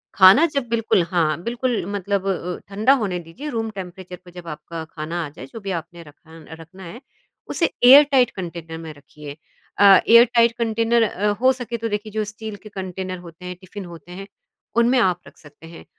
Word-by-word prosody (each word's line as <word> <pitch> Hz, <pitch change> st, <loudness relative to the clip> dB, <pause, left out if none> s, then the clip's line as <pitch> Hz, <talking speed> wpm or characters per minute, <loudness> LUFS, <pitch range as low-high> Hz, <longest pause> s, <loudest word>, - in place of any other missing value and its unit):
खाना 195 Hz, -, +7 dB
जब 275 Hz, -4 st, -2 dB
बिल्कुल 225 Hz, -4 st, +1 dB
हाँ, 160 Hz, -3 st, 0 dB
बिल्कुल 240 Hz, 0 st, -2 dB
मतलब 200 Hz, 0 st, -2 dB
अ 195 Hz, -, +2 dB, 0.2 s
अ, -, -, -11 dB
ठंडा 215 Hz, +7 st, +3 dB
होने 185 Hz, -4 st, -2 dB
दीजिए 175 Hz, -, -9 dB
रूम 225 Hz, -3 st, -3 dB
टेंपरेचर 185 Hz, -2 st, -9 dB
पे 180 Hz, -, -14 dB
जब 175 Hz, -1 st, -11 dB
आपका 165 Hz, +1 st, -7 dB
खाना 165 Hz, +2 st, -4 dB
आ -, -, -8 dB
जाए 145 Hz, -3 st, -11 dB
जो 225 Hz, -, -7 dB
भी 200 Hz, -2 st, -5 dB
आपने 175 Hz, +1 st, -15 dB
रखा 160 Hz, +1 st, -16 dB, 0.2 s
रखना 185 Hz, +4 st, -14 dB
है। 205 Hz, +8 st, -10 dB, 0.5 s
उसे 335 Hz, -, 0 dB
एयर 270 Hz, +4 st, +10 dB
टाइट 250 Hz, -3 st, +4 dB
कंटेनर 170 Hz, -3 st, -7 dB
में 160 Hz, -1 st, -8 dB
रखिए 145 Hz, 0 st, -12 dB, 0.4 s
अ, -, -, +3 dB, 0.2 s
एयर 235 Hz, +1 st, +8 dB
टाइट 235 Hz, 0 st, +5 dB
कंटेनर 230 Hz, 0 st, +1 dB
अ, 210 Hz, -1 st, -1 dB
हो 260 Hz, +1 st, +5 dB
सके 240 Hz, -2 st, -5 dB
तो 230 Hz, 0 st, -3 dB
देखिए 210 Hz, 0 st, -4 dB
जो 215 Hz, 0 st, -1 dB
स्टील 215 Hz, 0 st, -8 dB
के -, -, -9 dB
कंटेनर 185 Hz, -2 st, -6 dB
होते 170 Hz, +2 st, -13 dB
हैं 180 Hz, 0 st, -6 dB
टिफिन 190 Hz, +1 st, -9 dB
होते 175 Hz, 0 st, -12 dB
हैं 195 Hz, +2 st, -9 dB, 0.5 s
उनमें 235 Hz, +2 st, +4 dB
आप 180 Hz, -5 st, +2 dB
रख -, -, -17 dB
सकते 150 Hz, +2 st, -16 dB
हैं 165 Hz, -, -13 dB
190 Hz, 205 wpm, -21 LUFS, 170-230 Hz, 0.5 s, एयर